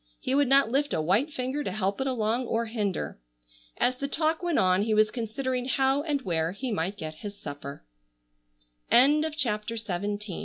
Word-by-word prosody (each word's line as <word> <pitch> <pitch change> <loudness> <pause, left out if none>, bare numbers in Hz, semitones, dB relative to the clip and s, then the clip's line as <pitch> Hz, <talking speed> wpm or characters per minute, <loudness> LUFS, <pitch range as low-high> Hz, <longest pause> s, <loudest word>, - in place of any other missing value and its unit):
He - - -2
would 285 0 +4
not 275 -3 +4
lift 280 +1 +1
a - - 0
white 205 - +2
finger 260 +2 -2
to - - -3
help 195 +2 -1
it 270 - 0
along 240 0 0
or 230 +1 0
hinder. 210 - -3 0.6
As 255 0 +1
the 280 - -3
talk 315 +3 0
went 345 -4 0
on 185 +1 +4
he 215 +1 +1
was 215 0 +4
considering 250 +2 -2
how 270 +1 +2
and 290 -3 -2
where 165 -2 0
he 250 +5 -4
might 195 0 -2
get 155 -2 -6
his 205 -1 -6
240 Hz, 160 wpm, -27 LUFS, 205-275 Hz, 0.6 s, would